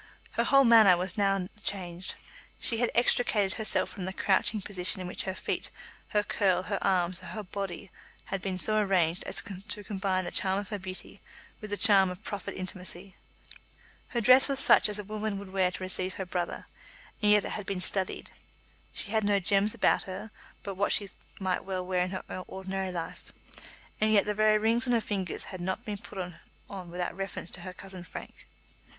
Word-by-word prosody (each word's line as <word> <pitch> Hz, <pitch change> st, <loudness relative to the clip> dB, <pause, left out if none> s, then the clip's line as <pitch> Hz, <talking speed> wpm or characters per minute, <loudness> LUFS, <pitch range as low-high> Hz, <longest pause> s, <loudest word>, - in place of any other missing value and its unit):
Her -, -, +1 dB
whole 275 Hz, 0 st, +6 dB
manner 220 Hz, -7 st, +7 dB
was 180 Hz, 0 st, -3 dB
now 195 Hz, -3 st, +1 dB, 0.2 s
changed. 180 Hz, -2 st, -2 dB, 0.4 s
She 230 Hz, -, +1 dB
had 240 Hz, +1 st, +2 dB
extricated 225 Hz, -4 st, +3 dB
herself 220 Hz, -, +1 dB
from 190 Hz, -3 st, -5 dB
the 190 Hz, -, -4 dB
crouching 210 Hz, +2 st, +2 dB
position 190 Hz, 0 st, -1 dB
in 185 Hz, -, -4 dB
which 180 Hz, -, -3 dB
her 190 Hz, -1 st, -3 dB
feet, -, -, -3 dB, 0.4 s
her 210 Hz, -1 st, +1 dB
curl, 185 Hz, -3 st, +1 dB
her -, -, -2 dB
arms, 180 Hz, -1 st, +2 dB
her -, -, -10 dB
whole 215 Hz, -, -5 dB
body 195 Hz, -1 st, -5 dB, 0.4 s
had 195 Hz, -, -1 dB
been 185 Hz, -1 st, -2 dB
so 215 Hz, +3 st, +2 dB
arranged 180 Hz, -4 st, +2 dB
as -, -, +2 dB, 0.2 s
to 210 Hz, -, -3 dB
combine 190 Hz, -2 st, -1 dB
the -, -, -4 dB
charm 190 Hz, 0 st, +1 dB
of 200 Hz, -1 st, -4 dB
her 205 Hz, -, -3 dB
beauty 185 Hz, 0 st, -6 dB, 0.4 s
with 215 Hz, -, -7 dB
the 205 Hz, -, -2 dB
charm 200 Hz, -4 st, +6 dB
of 180 Hz, +3 st, -8 dB
proffered 205 Hz, -2 st, -5 dB
intimacy. 185 Hz, 0 st, -7 dB, 0.9 s
Her 235 Hz, -, -1 dB
dress 255 Hz, +4 st, +7 dB
was 275 Hz, -1 st, +1 dB
such -, -, +6 dB
as 210 Hz, -, -2 dB
a 210 Hz, -, -4 dB
woman 215 Hz, 0 st, -3 dB
would 195 Hz, -1 st, -9 dB
wear 190 Hz, -2 st, +3 dB
to 185 Hz, -, -7 dB
receive 185 Hz, 0 st, -1 dB
her 190 Hz, -, -4 dB
brother, 180 Hz, -1 st, -3 dB, 0.6 s
and 210 Hz, -1 st, +5 dB
yet 210 Hz, -1 st, +5 dB
it -, -, -4 dB
had 205 Hz, -2 st, -5 dB
been 195 Hz, -2 st, -2 dB
studied. 190 Hz, +1 st, -1 dB, 0.6 s
She 200 Hz, -, 0 dB
had 220 Hz, -1 st, +2 dB
no 205 Hz, -1 st, +3 dB
gems 200 Hz, +3 st, +3 dB
about -, -, +3 dB
her 195 Hz, +3 st, -6 dB, 0.3 s
but 200 Hz, -, -4 dB
what 200 Hz, +2 st, 0 dB
she 200 Hz, -2 st, +2 dB, 0.3 s
might 185 Hz, -2 st, -1 dB
well 185 Hz, -1 st, -3 dB
wear 185 Hz, 0 st, 0 dB
in 180 Hz, +1 st, +1 dB
her 190 Hz, 0 st, -5 dB, 0.2 s
ordinary 190 Hz, 0 st, -4 dB
life, 170 Hz, -2 st, -6 dB, 0.7 s
and 215 Hz, 0 st, +3 dB
yet 205 Hz, -2 st, +5 dB
the 210 Hz, -, 0 dB
very 215 Hz, 0 st, +4 dB
rings 230 Hz, +4 st, +2 dB
on 245 Hz, -, +2 dB
her 235 Hz, -, +4 dB
fingers 195 Hz, -5 st, -3 dB
had 185 Hz, -, -6 dB
not 190 Hz, +1 st, -3 dB
been 205 Hz, -2 st, -4 dB
put -, -, -11 dB, 0.5 s
on 185 Hz, -3 st, -7 dB
without 175 Hz, 0 st, -3 dB
reference 195 Hz, -3 st, -5 dB
to 180 Hz, -, -6 dB
her 185 Hz, +1 st, -6 dB
cousin 185 Hz, -1 st, -8 dB
Frank. 175 Hz, -, -10 dB
195 Hz, 200 wpm, -29 LUFS, 185-210 Hz, 0.9 s, manner